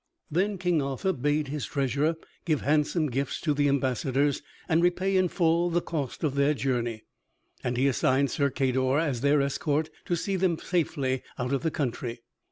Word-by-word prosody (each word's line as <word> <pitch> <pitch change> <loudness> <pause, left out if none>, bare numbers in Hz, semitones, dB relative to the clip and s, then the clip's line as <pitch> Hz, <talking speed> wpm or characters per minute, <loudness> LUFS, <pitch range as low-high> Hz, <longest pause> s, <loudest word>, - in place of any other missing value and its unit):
Then 195 +5 +1
King 175 -4 +1
Arthur 140 +7 -1
bade 145 +1 0
his 140 -7 -3
treasurer 140 +5 0 0.3
give 155 -5 0
handsome 150 +3 +2
gifts 135 +2 -2
to 150 - +1
the 145 0 +2
ambassadors, 140 +1 +1 0.3
and 160 +1 +3
repay 185 +2 +2
in 185 -1 +4
full 170 0 +2
the 170 0 +2
cost 150 -6 -4
of 150 -4 +1
their 140 +2 +2
journey, 120 -5 -1 0.6
and 125 0 -1
he 135 +2 +3
assigned 135 +1 +2
Sir 140 -1 +1
Cador 130 0 +1
as 145 -7 0
their 145 0 +3
escort 150 +2 -1
to 175 - 0
see 190 +3 -1
them 180 -3 +1
safely 145 -7 -1 0.2
out 125 +2 -2
of 135 - +1
the 160 - +1
country. 120 -5 -3
145 Hz, 175 wpm, -27 LUFS, 130-165 Hz, 0.6 s, in